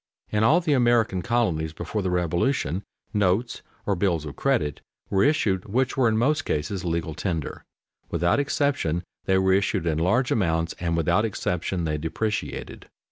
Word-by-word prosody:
_ - - -19
In 105 - +3
all 160 +10 +5
the 160 -4 +1
American 120 -7 +3
colonies 90 -10 0
before 85 +6 -3
the 95 - -1
Revolution 90 - 0 0.3
notes 105 +4 +1 0.2
or 100 - +1
bills 85 -4 0
of 75 - -7
credit 75 -2 0 0.3
were 95 - +3
issued 105 -11 +2
which 125 +5 0
were 130 -3 +3
in 110 - +1
most 145 +6 +2
cases 85 - -2
legal 85 -2 -2
tender. 80 -2 -3 0.5
Without 90 +8 +2
exception 140 - 0 0.2
they 95 -1 +3
were 95 0 +3
issued 100 -2 +1
in 80 -2 0
large 115 +10 +2
amounts 80 -5 +1
and 85 -1 -1
without 85 +5 +2
exception 90 -4 -2
they 75 -2 -1
depreciated. 105 +7 -4
95 Hz, 165 wpm, -25 LUFS, 85-115 Hz, 0.5 s, all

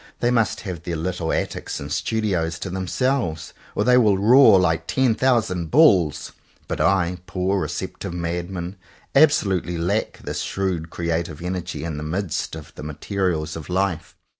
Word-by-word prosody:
They 120 - +2
must 115 -6 +1
have 90 -6 -6
their 85 0 -4
little 85 0 -2
attics - - -3
and - - -7
studios 90 -7 -1
to 95 - -5
them 95 0 -3
selves, 120 - -1 0.2
or - - +1
they 125 0 +5
will 105 -5 +4
roar 110 0 +7
like 80 -3 +1
ten 130 -3 +2
thousand 110 -10 +1
bulls. 95 - +4 0.4
But - - -2
I, 90 -2 +2
poor 95 +2 0
receptive 90 - -4
madman, 85 +2 -4 0.4
absolutely 100 - +3
lack 95 +6 -1
this - - -3
shrewd 90 -4 -2
creative 85 -2 -2
energy 90 -1 -4
in 80 -3 -4
the 75 - -5
midst 85 +1 -3
of 80 -3 -10
the - - -10
materials 80 +1 -2
of 80 +1 -8
life. 90 -3 -1
90 Hz, 160 wpm, -22 LUFS, 85-100 Hz, 0.4 s, roar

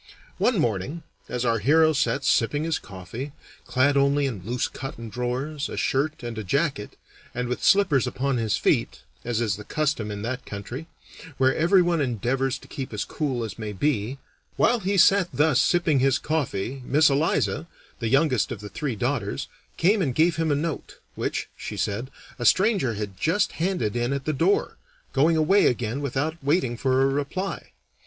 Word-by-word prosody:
One 240 -3 +2
morning, 120 - -1 0.3
as 125 0 -2
our 115 -1 +2
hero 155 +7 +4
sat 120 -5 0
sipping 145 +6 +2
his 165 -1 -1
coffee, 105 +9 -8 0.3
clad 140 +2 +2
only 140 +1 +3
in 110 -10 -4
loose 120 +4 -1
cotton 115 -3 -7
drawers, 130 +6 -3
a - - -6
shirt, 145 +1 0
and 115 -2 -5
a - - -4
jacket, 140 - -1 0.4
and 125 0 -2
with 125 - -3
slippers 195 - +4
upon 135 0 -1
his 110 -3 0
feet, - - 0 0.2
as 120 -2 -1
is 105 -5 0
the 105 - -8
custom 150 -5 -1
in 105 0 -5
that 125 +3 -3
country, 120 +10 -7 0.5
where 130 0 +3
everyone 175 0 +3
endeavors 130 +2 0
to - - -16
keep 130 -4 -6
as 105 - -2
cool 135 -6 -2
as 110 -1 -6
may 105 -2 -4
be 120 +2 -1 0.4
while 240 0 +3
he 200 0 -1
sat 195 0 +5
thus 145 -2 +3
sipping 160 -2 +2
his 135 0 +3
coffee 135 -5 -2
Miss 150 +4 +4
Eliza, 155 +3 +1 0.3
the 115 - -1
youngest 135 -4 +2
of - - -5
the 105 0 -8
three 145 -4 -3
daughters, 115 - -2 0.3
came 200 +5 +3
and 135 -8 -1
gave 165 +2 +3
him 160 -1 +1
a - - +3
note, 155 +2 -4 0.2
which, - - -3
she - - -7
said, 110 +6 -2 0.3
a 120 - -2
stranger 190 - +3
had 100 -2 -6
just 200 +6 +1
handed 165 - -1
in 120 +2 0
at 140 0 -3
the 155 - 0
door, 170 +8 +1 0.4
going 155 +4 +3
away 190 +6 +4
again 125 +2 -1
without 145 +4 -2
waiting 140 -4 +1
for 130 +2 +2
a - - +4
reply. 145 +8 -3
135 Hz, 180 wpm, -25 LUFS, 120-155 Hz, 0.5 s, sat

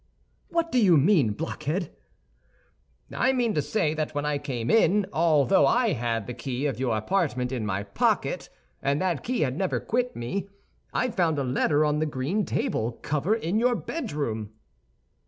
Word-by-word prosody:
"What 335 -1 0
do 250 -3 +3
you 180 -5 +6
mean, 145 - +4
blockhead?" 165 - -3 1.2
"I 260 - +2
mean 240 -4 +1
to 150 - +1
say 160 -3 0
that 155 -1 -3
when 145 0 -1
I 150 -1 0
came 125 -5 -3
in, 210 -2 +4
although 160 +2 +4
I 235 -5 +3
had 115 -4 -2
the 125 - -5
key 130 +2 -4
of 135 -5 -1
your 120 -4 0
apartment 130 - 0
in 120 -5 -2
my 100 0 -1
pocket, 100 - 0 0.3
and 140 +1 +1
that 180 -5 -1
key 250 +1 -1
had 130 -4 0
never 190 +3 0
quit 250 +2 -1
me, 190 +13 -4 0.4
I 250 - 0
found 170 -7 +1
a 140 - 0
letter 145 +4 +2
on 150 0 +1
the 155 - 0
green 150 +9 -1
table 115 +2 -1
cover 155 +9 +1
in 210 -1 -1
your 245 +1 +3
bedroom." 140 - -4
150 Hz, 175 wpm, -26 LUFS, 130-200 Hz, 1.2 s, you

